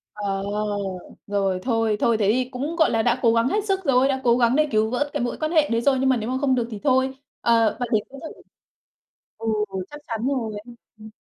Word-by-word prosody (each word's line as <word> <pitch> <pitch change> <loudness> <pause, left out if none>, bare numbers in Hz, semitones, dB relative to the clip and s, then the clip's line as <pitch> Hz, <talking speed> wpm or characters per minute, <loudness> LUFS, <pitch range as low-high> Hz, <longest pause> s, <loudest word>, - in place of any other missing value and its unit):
Ờ. 200 -2 -3 0.8
Rồi, 195 -2 0
thôi 225 -3 +1
thôi 230 -1 +2
thế 205 -1 +2
thì 250 +2 0
cũng, 280 +6 -4
gọi 325 -1 +3
là, 225 - +2
đã 240 +2 +1
cố 230 -2 +4
gắng 230 +1 +2
hết 415 +8 0
sức 385 -2 -1
rồi, 265 -1 +4
đã 265 -1 -1
cố 235 -1 +4
gắng 240 0 +3
đề 305 +1 +3
cứu 215 0 +2
vớt 285 +5 -1
cái - - -1
mối 245 - -3
quan 310 0 -2
hệ 310 -3 +3
đấy 230 0 +1
rồi 270 +1 +3
nhưng 265 0 +2
mà 260 - +3
nếu 225 +1 -4
mà 260 - -1
không 270 -2 +2
được 240 -2 -1
thì 215 - -6
thôi. 260 -1 +2 0.3
Ờ, 230 -2 +3
bạn 245 - -2
đấy 215 -3 +3
cũng 275 - -11
thử 320 - -8 1.0
Ừ, 225 - -6 0.4
chắc 295 - -9
chắn 230 +1 -2
rồi, 245 -6 -2
ừ, 240 - -12 0.2
ừm. 215 0 -12
245 Hz, 245 wpm, -23 LUFS, 225-270 Hz, 1.0 s, cố